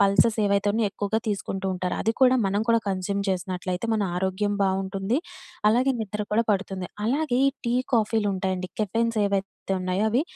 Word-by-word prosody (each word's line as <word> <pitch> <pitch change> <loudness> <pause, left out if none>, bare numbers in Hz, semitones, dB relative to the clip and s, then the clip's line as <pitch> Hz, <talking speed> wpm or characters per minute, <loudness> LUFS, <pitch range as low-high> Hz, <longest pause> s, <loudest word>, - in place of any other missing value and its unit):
Pulses 200 +3 +4
ఏవైతే 200 0 +2
ఉన్నాయో 220 -1 +1
ఎక్కువగా 205 +2 -1
తీసుకుంటూ 195 -1 -3
ఉంటారు. 180 0 -2
అది 225 - +2
కూడా 260 -1 +6
మనం 200 +2 +1
కూడా 230 0 +5
కన్జ్యూమ్ 195 +1 -1
చేసినట్లయితే 185 +1 -2
మన 215 -1 +1
ఆరోగ్యం 190 +3 0
బావుంటుంది. 195 +3 0 0.5
అలాగే 250 +5 +3
నిద్ర 210 -1 -4
కూడా 225 +2 +4
పడుతుంది. 195 -2 -1 0.2
అలాగే 275 +1 +1
ఈ - - +1 0.2
టీ, 235 - +1 0.2
కాఫీలుంటాయండి 195 -5 0
కెఫెన్స్ 230 +2 0
ఏవైతే 195 -1 -3
ఉన్నాయో 185 +3 0
అవి 245 +6 +2
200 Hz, 155 wpm, -25 LUFS, 190-225 Hz, 0.5 s, కూడా